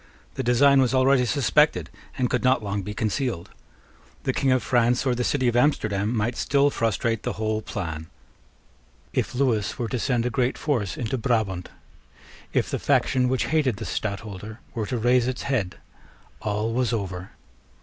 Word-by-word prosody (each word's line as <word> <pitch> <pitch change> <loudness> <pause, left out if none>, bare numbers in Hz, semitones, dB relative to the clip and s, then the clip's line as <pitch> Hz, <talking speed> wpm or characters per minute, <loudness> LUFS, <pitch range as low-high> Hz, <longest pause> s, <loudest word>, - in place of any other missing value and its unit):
The - - -3
design 135 +3 +5
was 130 0 +2
already 130 0 +4
suspected, 135 0 +2 0.3
and 125 - +1
could - - -1
not 125 -1 +3
be - - -8
long 100 0 -2
concealed. 105 -1 -2 0.7
The - - 0
King 135 - +1
of 130 -1 +2
France 120 +1 +2
or 130 - +2
the 125 0 -1
city 130 0 +1
of 120 - +1
Amsterdam 105 -6 +2
might 115 +3 0
still 140 0 +2
frustrate 115 -1 0
the - - -3
whole 110 0 -1
plan. 80 -6 -5 1.1
If - - -1
Lewis 125 -5 +1
were 120 -4 -2
to 125 - -2
send 120 -1 0
a 125 - 0
great 130 -1 0
force 115 - -1
into 120 +2 -2
Brabant, 105 -6 0 0.8
if - - +1
the - - -1
faction 125 -1 +2
which 130 0 +1
hated 135 -9 +2
the - - -6
Stadtholder 105 +1 -5
were 110 -3 -3
to 125 - -2
raise 120 +1 +3
its 130 -1 -3
head, 115 -10 -1 0.7
all 105 +2 -1
was 125 -1 +1
over. 95 -4 -4
120 Hz, 170 wpm, -25 LUFS, 105-130 Hz, 1.1 s, design